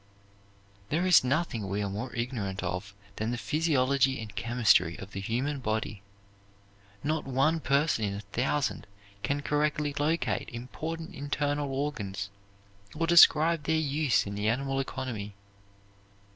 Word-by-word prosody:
There 165 +5 +1
is 180 -6 +7
nothing 125 - -1
we 100 +2 -1
are - - -1
more 105 +6 -4
ignorant 115 -6 -3
of 100 +2 -4 0.2
than 110 +1 -1
the 120 - -2
physiology 135 -3 +2
and 110 -3 -8
chemistry 110 -6 +3
of 95 0 -9
the 100 - -5
human 130 +8 -1
body. 110 -3 -2 1.0
Not 155 +2 -1
one 135 +5 +2
person 140 -6 +1
in 100 -1 -2
a 100 - -5
thousand 120 +3 -1 0.3
can 145 +4 -1
correctly 150 0 0
locate 160 +3 0
important 160 +8 -6
internal 145 -1 -1
organs 105 -9 -3 0.6
or 165 +2 0
describe 165 -2 +6
their 160 - +2
use 145 -6 +1
in 100 - -5
the 105 +1 0
animal 135 +3 0
economy. 120 -7 -4
135 Hz, 135 wpm, -29 LUFS, 110-150 Hz, 1.0 s, is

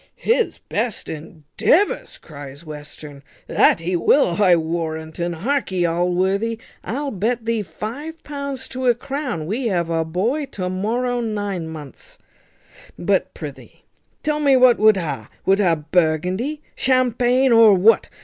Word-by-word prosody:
"His 465 0 0
best 235 -4 -3
endeavours!" 160 - 0
cries 145 0 -11
Western, 150 -1 -10 0.2
"that - - +3
he 180 +2 -1
will, 175 - +3
I 185 -3 +6
warrant 160 -1 -3
un. 170 0 -1
Harkee, 190 - -1
Allworthy, 185 +6 0 0.3
I'll 280 +4 -3
bet 225 +4 -1
thee 230 -1 0
five 285 - -7
pounds 280 -2 -5
to 260 0 -3
a 240 - +5
crown 255 - -4
we 230 +8 -2
have 170 -5 -1
a 165 0 +1
boy 220 - -1
to 180 -2 -3
morrow 240 +6 -1
nine 205 -6 -3
months; 160 - -10 0.8
but - - 0
prithee - - -10 0.4
tell 300 0 0
me 280 -3 +4
what 250 -1 +5
wut 215 -1 +5
ha! 150 - -4 0.2
Wut 195 +1 +3
ha 175 -5 +3
Burgundy, 180 - 0
Champaigne, 255 0 +2
or 225 -3 +7
what? 210 +5 +4
205 Hz, 140 wpm, -21 LUFS, 165-255 Hz, 0.8 s, or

